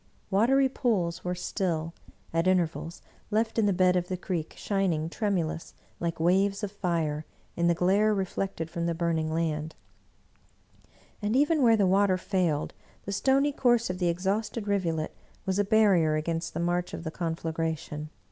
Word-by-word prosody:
Watery 260 +7 +4
pools 200 -11 -1
were 180 0 -2
still, 170 -3 -2 0.4
at 165 +2 +1
intervals, 170 -2 0 0.3
left 220 +1 0
in 210 - +3
the - - +3
bed 185 -1 +3
of 180 -1 0
the 185 - -3
creek, 175 -3 -4
shining 180 -6 0
tremulous, 175 -7 -2 0.2
like 165 -1 -2
waves 195 +5 +2
of 200 - -2
fire, 165 -6 -1 0.3
in 170 0 +1
the 170 - +3
glare 195 +5 +3
reflected 190 -4 -2
from 170 0 -3
the 170 - -1
burning 165 -2 0
land; 160 -1 -2 1.5
and 210 +3 0
even 295 +3 +3
where 230 -3 +5
the 200 - +3
water 190 0 +3
failed, 180 -6 -1 0.3
the 200 - -4
stony 270 +7 +2
course 240 -6 +2
of 180 - -6
the 175 -2 +2
ex 170 +2 -3
hausted 210 +2 -1
rivulet 170 -6 -1 0.3
was 190 +1 0
a - - +4
barrier 195 -7 +4
against 165 +2 -2
the - - -1
march 175 +1 -1
of - - -7
the 160 - -4
con 165 -1 -2
flagration. 160 -2 -3
180 Hz, 165 wpm, -28 LUFS, 165-205 Hz, 1.5 s, where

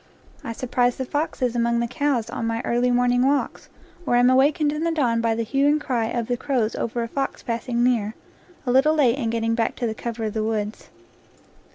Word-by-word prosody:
I 230 - -4
surprise 245 0 0
the 260 - -4
foxes 255 -4 -2
among 235 0 +1
the 235 - +1
cows 255 -2 -1
on 230 - -3
my 230 0 -1
early 240 +1 +1
morning 245 0 +2
walks, 280 +1 0 0.3
or 245 - +1
am 245 +1 +5
awakened 290 +3 +3
in 305 +1 -3
the 335 - +1
dawn 245 -8 +1
by 230 -1 +1
the 230 - -1
hue 275 +5 +1
and 300 +1 +3
cry 250 -6 -1
of 235 0 -2
the 245 +1 -2
crows 245 -5 -1
over 235 +1 -2
a - - -3
fox 270 +3 -3
passing 235 +1 -1
near, 225 -4 +1 0.5
a 250 - 0
little 275 +5 +4
late 270 -3 +3
in 230 -4 -1
getting 230 0 0
back 230 -1 0
to 245 - -3
the 220 - -1
cover 230 0 -5
of 215 -1 -2
the 220 - -1
woods. 215 -1 -3
245 Hz, 220 wpm, -23 LUFS, 230-270 Hz, 0.5 s, am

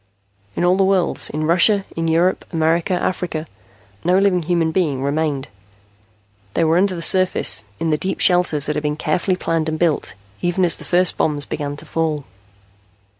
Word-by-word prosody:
In - - -1
all 180 +1 +3
the 195 - +3
world 190 -3 +1
in 155 +1 -3
Russia, 185 +5 +3
in 165 0 -2
Europe, 170 +3 +1
America, 165 +2 +1
Africa 175 -3 -2 0.6
no 180 +2 +3
living 195 -2 +2
human 165 -1 0
being 155 -7 0
remained. 145 -1 -1 1.1
They - - +2
were 165 +2 +3
under 190 -1 +1
the 170 - -5
surface, 185 - +2
in 165 -1 -1
the 150 - +1
deep 190 - -3
shelters 175 -5 +3
that 150 - -2
had 150 - -1
been 150 0 -1
carefully 180 +5 0
planned 165 -3 -1
and 155 - -3
built, 155 - 0 0.3
even 175 +1 +1
as 170 - +2
the - - -12
first 180 0 +1
bombs 145 -2 0
began 145 -1 -4
to - - -8
fall. 155 -3 -2
165 Hz, 175 wpm, -19 LUFS, 155-180 Hz, 1.1 s, all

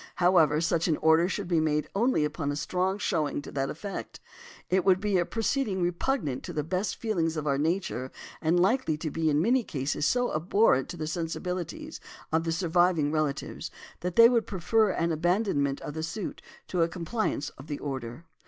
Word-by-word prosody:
However, 175 -4 +4
such 165 0 +1
an 155 -3 +2
order 160 +3 +4
should 200 -2 -3
be 170 -2 +2
made 150 -1 +1
only 225 -6 +2
upon 150 -1 -2
a - - -3
strong 185 +5 -1
showing 155 -9 -1
to - - -9
that 135 -1 -1
effect. 195 +5 -6 0.5
"It 185 0 +2
would 185 -1 +4
be 200 -2 +1
a 175 - 0
proceeding 225 -3 -1
repugnant 175 - -1
to - - -6
the 150 - -1
best 185 +6 -2
feelings 165 -8 -1
of 155 - -3
our 140 -2 +1
nature, 155 -5 -1 0.3
and 165 +2 +2
likely 190 - +2
to 155 -1 -4
be 160 +1 0
in 150 +1 +2
many 250 +4 +3
cases 145 -2 -1
so 245 0 +1
abhorrent 160 - +2
to 175 - -6
the 155 - -3
sensibilities 180 - -4 0.3
of 160 +1 +1
the 165 - 0
surviving 170 -2 +2
relatives, 155 -3 -2 0.3
that 180 0 -4
they 230 0 +9
would 235 -2 +1
prefer 210 +4 +2
an 170 -2 0
abandonment 160 -4 +1
of 150 - -6
the 160 - -4
suit 165 +5 -5 0.3
to 180 - 0
a 165 - +3
compliance 170 -3 -2
with 135 - -12
the 145 -2 -3
order." 135 +1 -6
170 Hz, 190 wpm, -28 LUFS, 155-195 Hz, 0.5 s, they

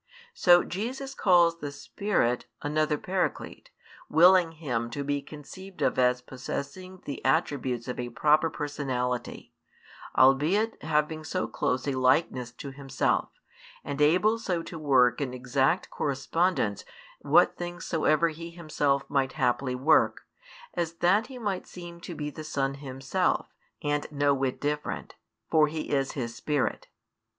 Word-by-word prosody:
So 175 - +5
Jesus 260 +8 -4
calls 175 -6 +4
the 145 -2 -5
Spirit 140 - -1 0.2
another 150 +1 +1
Paraclete, 185 +4 -3 0.4
willing 175 +1 +6
Him 125 -8 -3
to 140 +4 -4
be 145 0 -1
conceived 180 +7 -9
of - - +1
as 125 0 +2
possessing 160 +9 -7
the 140 - -6
attributes 130 -3 0
of 125 - -4
a 120 0 -3
proper 155 +6 +3
personality; 130 -5 -3 0.6
albeit 155 - +3
having 155 0 0
so 185 +4 -2
close 130 +2 -1
a - - +1
likeness 130 -2 +2
to 140 +3 -8
Himself, 135 -1 -1 0.5
and 145 0 -4
able 185 +9 +4
so 180 -6 -2
to 165 - -8
work 130 -4 +3
in 130 -2 -3
exact 130 +6 0
correspondence 140 - 0 0.4
what - - +4
things 175 0 -6
soever 160 0 +2
He 165 +2 -8
Himself 150 -5 -1
might 135 -2 0
haply 125 +1 0
work, 145 +5 +3 0.5
as 170 -1 -2
that 185 +7 +2
He 260 -1 -9
might 205 -6 -3
seem 170 -1 -10
to 175 -1 -7
be 150 -1 -4
the 155 - -8
Son 135 -3 -1
Himself 140 +6 -1 0.3
and 145 0 -1
no 145 -1 +2
whit 135 -1 -1
different: 150 +1 -3 0.4
for 155 -2 +5
He 155 +1 -5
is 135 -1 0
His 120 -4 -4
Spirit. 145 +1 -2
150 Hz, 140 wpm, -28 LUFS, 135-170 Hz, 0.6 s, willing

